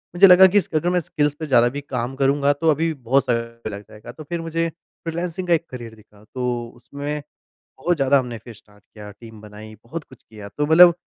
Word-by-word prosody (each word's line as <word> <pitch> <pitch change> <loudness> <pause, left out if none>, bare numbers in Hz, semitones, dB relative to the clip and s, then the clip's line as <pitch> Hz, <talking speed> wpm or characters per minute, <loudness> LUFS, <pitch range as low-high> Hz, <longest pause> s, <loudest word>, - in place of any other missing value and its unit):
मुझे 195 +3 +8
लगा 185 +1 +9
कि 195 +2 +1
इस 200 - +1
अगर 155 +3 +1
मैं 180 0 +2
स्किल्स 150 -3 -1
पे 160 - -4
ज़्यादा 120 -4 +4
भी 145 - -3
काम 130 -2 -4
करूँगा 140 +1 +2
तो 160 +3 0
अभी 160 +2 0
बहुत 135 0 +1
सारा 115 -2 -3
लग 100 0 -7
जाएगा 105 - -11
तो 155 - -11
फिर 170 +3 -4
मुझे 165 0 -2
फ्रीलांसिंग 170 +2 -6
का 175 - +3
एक 165 0 +1
करियर 120 -3 -9
दिखा। 105 -1 -21
तो 125 -2 -2
उसमें 145 +4 -6 0.6
बहुत 175 +6 0
ज़्यादा 140 -1 +3
हमने 125 -3 -4
फिर 120 - -11
स्टार्ट 105 -1 -21
किया 105 -1 -12
टीम 110 -2 -12
बनाई 105 +1 -12
बहुत 155 +7 -7
कुछ 130 - -18
किया 105 -2 -11
तो 150 - +1
मतलब 170 +3 +8
140 Hz, 220 wpm, -21 LUFS, 115-165 Hz, 0.6 s, लगा